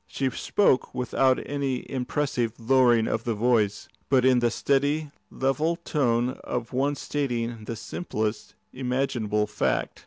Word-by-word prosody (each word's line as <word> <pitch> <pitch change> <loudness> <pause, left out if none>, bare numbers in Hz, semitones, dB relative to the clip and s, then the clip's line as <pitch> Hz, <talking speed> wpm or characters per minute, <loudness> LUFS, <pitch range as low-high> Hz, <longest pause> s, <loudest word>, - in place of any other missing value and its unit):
She 135 -1 -1
spoke 135 -5 +1
without 130 +1 +2
any 140 -3 -2
impressive 125 -3 -1
lowering 120 -1 +4
of 115 - -1
the 115 -2 -1
voice, 110 -2 +1 0.2
but 130 -2 +4
in 130 -1 +5
the 120 0 +2
steady, 145 +4 0 0.2
level 150 +5 0
tone 125 -6 0
of 120 -1 -4
one 140 +3 +1
stating 120 -6 -3
the 115 - -4
simplest 110 -3 -4 0.2
imaginable 125 -5 0
fact. - - -1
125 Hz, 130 wpm, -26 LUFS, 115-135 Hz, 0.2 s, in